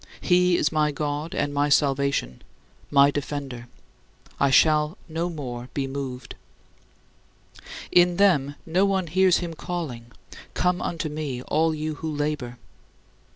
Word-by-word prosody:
He 180 Hz, -1 st, +3 dB
is 150 Hz, -, +1 dB
my 155 Hz, -1 st, +1 dB
God 150 Hz, +2 st, -3 dB
and 145 Hz, -, -1 dB
my 145 Hz, +1 st, +1 dB
salvation, 140 Hz, -, +1 dB, 0.5 s
my 140 Hz, 0 st, +5 dB
defender; 140 Hz, -4 st, -5 dB, 0.7 s
I 140 Hz, -, +3 dB
shall 150 Hz, +5 st, +3 dB
no 165 Hz, +2 st, -2 dB
more 125 Hz, -6 st, -6 dB
be 140 Hz, -, -1 dB
moved." 135 Hz, -2 st, -6 dB, 1.6 s
In 175 Hz, 0 st, +4 dB
them, 150 Hz, -9 st, +3 dB
no 175 Hz, +4 st, +2 dB
one 195 Hz, -2 st, +1 dB
hears 185 Hz, +2 st, +3 dB
him 170 Hz, -2 st, -4 dB
calling, 155 Hz, -9 st, -5 dB, 0.5 s
"Come 180 Hz, 0 st, +1 dB
unto 165 Hz, -2 st, -3 dB
me 145 Hz, -5 st, -4 dB
all 160 Hz, +3 st, +1 dB
you 155 Hz, +1 st, -3 dB
who 160 Hz, -, -3 dB
labor." 145 Hz, -5 st, -3 dB
150 Hz, 130 wpm, -24 LUFS, 140-170 Hz, 1.6 s, my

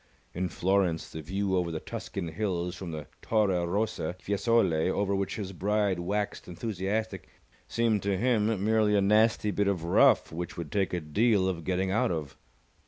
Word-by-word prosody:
In 90 Hz, +1 st, -2 dB
Florence, 90 Hz, -1 st, 0 dB
the 80 Hz, -, -6 dB
view 95 Hz, +4 st, -1 dB
over 90 Hz, -2 st, 0 dB
the 80 Hz, -, -3 dB
Tuscan 85 Hz, -, -5 dB
Hills 90 Hz, -1 st, -2 dB
from 90 Hz, -1 st, -7 dB
the 75 Hz, -2 st, -6 dB, 0.2 s
Torre 95 Hz, -6 st, +1 dB
Rosa, 100 Hz, -3 st, -1 dB
Fiesole, 100 Hz, -5 st, +1 dB
over 100 Hz, +1 st, 0 dB
which 100 Hz, 0 st, -1 dB
his 95 Hz, -3 st, -5 dB
bride 100 Hz, 0 st, 0 dB
waxed 100 Hz, +4 st, -2 dB
enthusiastic, 100 Hz, +2 st, -3 dB, 0.4 s
seemed 115 Hz, -3 st, +1 dB
to 100 Hz, -1 st, 0 dB
him 110 Hz, -3 st, +1 dB
merely 110 Hz, -1 st, +3 dB
a 100 Hz, -, +4 dB
nasty 105 Hz, +1 st, +3 dB
bit 100 Hz, 0 st, 0 dB
of 95 Hz, -4 st, 0 dB
rough 85 Hz, -, +4 dB
which 85 Hz, +1 st, -5 dB
would 85 Hz, -4 st, -6 dB
take 100 Hz, -2 st, 0 dB
a 90 Hz, -, 0 dB
deal 95 Hz, +6 st, +2 dB
of 85 Hz, -3 st, -2 dB
getting 95 Hz, 0 st, 0 dB
out 105 Hz, -, +2 dB
of. 75 Hz, -5 st, -4 dB
95 Hz, 170 wpm, -29 LUFS, 85-105 Hz, 0.4 s, a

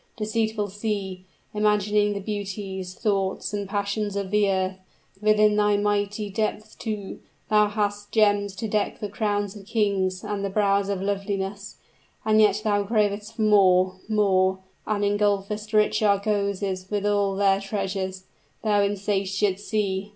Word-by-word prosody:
Deceitful 220 Hz, -1 st, -1 dB
sea 195 Hz, -2 st, -4 dB, 0.3 s
imaging 210 Hz, 0 st, +2 dB
the 200 Hz, -, -3 dB
beauties, 195 Hz, -2 st, -5 dB
thoughts, 195 Hz, -1 st, -1 dB
and 200 Hz, -2 st, -3 dB
passions 205 Hz, 0 st, -2 dB
of 200 Hz, -2 st, -3 dB
the 210 Hz, -1 st, +3 dB
earth! 190 Hz, 0 st, 0 dB, 0.4 s
Within 215 Hz, 0 st, +4 dB
thy 210 Hz, -1 st, +3 dB
mighty 205 Hz, 0 st, 0 dB
depths, 215 Hz, +1 st, -3 dB
too, 210 Hz, -4 st, -5 dB, 0.3 s
thou 210 Hz, 0 st, +5 dB
hast 205 Hz, -1 st, -2 dB
gems 205 Hz, -2 st, +2 dB
to 220 Hz, +4 st, -3 dB
deck 210 Hz, -1 st, -1 dB
the 210 Hz, -, -4 dB
crowns 205 Hz, -1 st, -1 dB
of 200 Hz, -1 st, -12 dB
kings 195 Hz, -4 st, 0 dB
and 205 Hz, -1 st, -3 dB
the 200 Hz, -, -1 dB
brows 200 Hz, 0 st, +1 dB
of 195 Hz, -1 st, -2 dB
loveliness; 200 Hz, 0 st, -3 dB, 0.5 s
and 215 Hz, 0 st, +4 dB
yet 210 Hz, 0 st, +3 dB
thou 205 Hz, -2 st, +2 dB
cravest 210 Hz, 0 st, 0 dB
for 220 Hz, -, -1 dB
more 185 Hz, -3 st, +4 dB
more 190 Hz, -3 st, +3 dB, 0.3 s
and 210 Hz, -1 st, 0 dB
engulfest 205 Hz, +1 st, 0 dB
rich 215 Hz, 0 st, +3 dB
argosies 200 Hz, -2 st, 0 dB
with 205 Hz, -1 st, -1 dB
all 205 Hz, -1 st, +1 dB
their 195 Hz, 0 st, +3 dB
treasures 195 Hz, -2 st, -3 dB, 0.4 s
thou 210 Hz, -2 st, +3 dB
insatiate 200 Hz, -1 st, 0 dB
sea! 205 Hz, -2 st, -2 dB
205 Hz, 145 wpm, -25 LUFS, 195-210 Hz, 0.5 s, thou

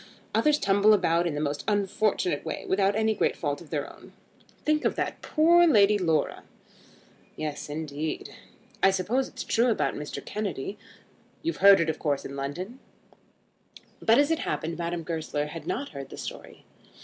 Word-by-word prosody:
Others 300 Hz, -1 st, +3 dB
tumble 200 Hz, -2 st, +4 dB
about 175 Hz, -3 st, +2 dB
in 155 Hz, -, -2 dB
the -, -, -2 dB
most 145 Hz, -1 st, -2 dB
unfortunate 200 Hz, -5 st, 0 dB
way, 160 Hz, -, -5 dB
without 195 Hz, +1 st, +2 dB
any 220 Hz, 0 st, +2 dB
great -, -, 0 dB
fault 145 Hz, -2 st, -2 dB
of 165 Hz, -, -13 dB
their 145 Hz, -3 st, -2 dB
own. -, -, -15 dB, 0.5 s
Think 305 Hz, 0 st, +2 dB
of -, -, +1 dB
that -, -, -3 dB
poor 340 Hz, +2 st, +5 dB
Lady 210 Hz, -7 st, +5 dB
Laura." 160 Hz, -5 st, 0 dB, 0.9 s
"Yes, 150 Hz, -1 st, -5 dB
indeed." 150 Hz, 0 st, -4 dB, 0.5 s
"I 195 Hz, -, +6 dB
suppose 205 Hz, +8 st, 0 dB
it's -, -, -7 dB
true 235 Hz, +2 st, +2 dB
about 225 Hz, -, +1 dB
Mr. 150 Hz, -, -6 dB
Kennedy. 200 Hz, -2 st, -4 dB, 0.6 s
You've 335 Hz, +1 st, -2 dB
heard 200 Hz, 0 st, +8 dB
of -, -, +3 dB
it 165 Hz, -, 0 dB
of 155 Hz, -, -11 dB
course 145 Hz, -3 st, -1 dB
in 140 Hz, -, -6 dB
London." 175 Hz, -, -5 dB, 1.2 s
But 225 Hz, +1 st, +4 dB
as 290 Hz, +2 st, +3 dB
it 325 Hz, -, +1 dB
happened 165 Hz, +1 st, -3 dB
Madame 170 Hz, 0 st, -3 dB
Goesler 155 Hz, -3 st, -3 dB
had 155 Hz, +1 st, -8 dB
not 280 Hz, +4 st, -2 dB
heard 140 Hz, -2 st, -8 dB
the -, -, -10 dB
story. -, -, -8 dB
185 Hz, 175 wpm, -27 LUFS, 155-215 Hz, 1.2 s, heard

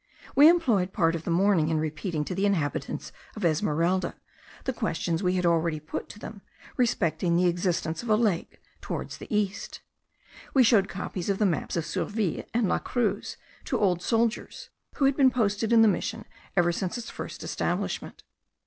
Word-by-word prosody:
We 290 Hz, +3 st, +9 dB
employed 230 Hz, -, +2 dB
part 165 Hz, -6 st, +2 dB
of 165 Hz, -1 st, -5 dB
the -, -, -3 dB
morning 175 Hz, -2 st, +3 dB
in 160 Hz, -, +1 dB
repeating 155 Hz, +1 st, -2 dB
to 185 Hz, -, -4 dB
the 195 Hz, +3 st, +1 dB
inhabitants 160 Hz, -9 st, -2 dB, 0.2 s
of -, -, -3 dB
Esmeralda 170 Hz, +2 st, +1 dB, 0.5 s
the 260 Hz, -, -2 dB
questions 165 Hz, -4 st, -1 dB
we 180 Hz, -1 st, +1 dB
had 180 Hz, -1 st, 0 dB
already 165 Hz, -2 st, +2 dB
put 155 Hz, +1 st, -6 dB
to -, -, -10 dB
them, 210 Hz, -1 st, -9 dB, 0.3 s
respecting 175 Hz, -, +1 dB
the 180 Hz, -, +3 dB
existence 175 Hz, -2 st, 0 dB
of 240 Hz, -, -7 dB
a 215 Hz, -, +5 dB
lake 210 Hz, -6 st, 0 dB, 0.2 s
towards -, -, -5 dB
the -, -, -9 dB
east. 210 Hz, -2 st, -2 dB, 0.7 s
We 265 Hz, -, +7 dB
showed 215 Hz, -4 st, +4 dB
copies 185 Hz, -1 st, -4 dB
of 195 Hz, -, +1 dB
the 210 Hz, -, +2 dB
maps 175 Hz, -6 st, -1 dB
of 165 Hz, -, -1 dB
Surville 210 Hz, -5 st, -2 dB
and 230 Hz, -2 st, +1 dB
La -, -, +1 dB
Cruz 240 Hz, -3 st, -2 dB, 0.3 s
to -, -, 0 dB
old 180 Hz, -4 st, +2 dB
soldiers, 230 Hz, +2 st, -1 dB, 0.2 s
who 280 Hz, -, +2 dB
had 270 Hz, 0 st, +3 dB
been 270 Hz, -2 st, +5 dB
posted 220 Hz, -2 st, 0 dB
in 230 Hz, -1 st, +7 dB
the -, -, +6 dB
mission 220 Hz, +3 st, -1 dB, 0.3 s
ever 175 Hz, -1 st, +4 dB
since 180 Hz, +5 st, -3 dB
its 240 Hz, -1 st, -7 dB
first -, -, -7 dB
establishment. -, -, -3 dB
190 Hz, 180 wpm, -27 LUFS, 170-225 Hz, 0.7 s, We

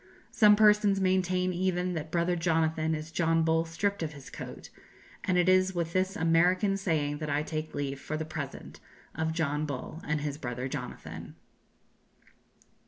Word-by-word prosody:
Some 210 Hz, -3 st, +6 dB
persons 210 Hz, -2 st, +5 dB
maintain 185 Hz, -1 st, +1 dB
even 180 Hz, 0 st, 0 dB
that 160 Hz, -2 st, -4 dB
Brother 170 Hz, +2 st, +1 dB
Jonathan 160 Hz, -1 st, +1 dB
is 155 Hz, +1 st, -7 dB
John 165 Hz, -1 st, +2 dB
Bull 160 Hz, 0 st, +2 dB
stripped 200 Hz, +5 st, -2 dB
of 155 Hz, -2 st, -3 dB
his 140 Hz, -2 st, -12 dB
coat, -, -, -9 dB, 0.5 s
and 185 Hz, -, +2 dB
it 180 Hz, 0 st, +3 dB
is 185 Hz, 0 st, +4 dB
with 170 Hz, -1 st, -2 dB
this 185 Hz, +2 st, +1 dB
American 180 Hz, +3 st, +3 dB
saying 155 Hz, -7 st, -1 dB
that 155 Hz, -1 st, -4 dB
I 145 Hz, +1 st, +1 dB
take 155 Hz, 0 st, -5 dB
leave, 140 Hz, -1 st, -3 dB
for 155 Hz, -, -3 dB
the 160 Hz, -, -3 dB
present, 155 Hz, -3 st, -7 dB, 0.3 s
of 160 Hz, +1 st, -1 dB
John 155 Hz, -2 st, -1 dB
Bull 145 Hz, +4 st, -6 dB
and 150 Hz, 0 st, -1 dB
his 145 Hz, 0 st, -3 dB
brother 125 Hz, -1 st, -4 dB
Jonathan." 130 Hz, -2 st, -7 dB
165 Hz, 165 wpm, -29 LUFS, 155-185 Hz, 0.5 s, Some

